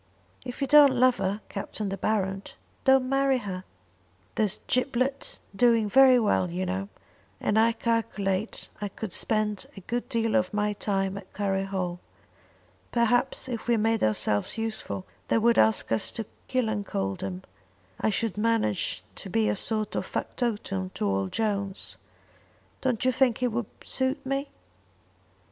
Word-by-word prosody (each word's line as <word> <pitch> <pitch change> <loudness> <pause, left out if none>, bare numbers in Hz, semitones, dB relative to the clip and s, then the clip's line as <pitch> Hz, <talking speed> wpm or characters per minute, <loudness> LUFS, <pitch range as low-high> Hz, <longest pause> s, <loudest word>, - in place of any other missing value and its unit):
"If 245 +3 -7
you 275 - +1
don't 290 -2 +7
love 255 0 +5
her, 195 +2 -1
Captain 200 +1 -4
De 195 - -2
Baron, 195 -1 0 0.4
don't 265 -1 +5
marry 270 0 +3
her." 190 -6 -5 0.7
"There's 210 -2 +1
Giblet 255 +1 0 0.2
doing 230 -1 +4
very 260 +3 +7
well, 205 -5 +2
you 180 +2 -2
know; 190 +2 -3 0.5
and 210 - +2
I 230 +1 +4
calculate 215 -3 -1
I 205 - -1
could 200 -1 -6
spend 215 -2 0
a - - -7
good 240 +6 -3
deal 230 -1 0
of 180 +3 +1
my 210 0 +1
time 195 -1 -1
at 190 - -15
Curry 195 -1 0
Hall. 180 -3 -3 0.9
Perhaps 245 +3 +2
if 235 -3 -4
we 235 -1 +3
made 225 +1 +1
ourselves 105 - +1
useful, 220 - -3 0.2
they - - +3
would 235 +1 +4
ask 110 +1 +3
us 115 - 0
to 225 - -4 0.2
Killancodlem. 100 - -2 0.6
I - - +2
should 215 -1 -1
manage 220 - +1
to - - -7
be 110 -1 +2
a 105 - +1
sort 215 - -1
of - - -2
factotum 205 -6 -2
to 105 - -1
old 95 -1 0
Jones. 200 -3 -2 0.8
Don't 255 -2 0
you 255 - +5
think 255 -1 +2
it 250 - +2
would 230 -1 -2 0.2
suit 260 0 -1
me?" 275 +1 -1
215 Hz, 150 wpm, -27 LUFS, 195-240 Hz, 0.9 s, don't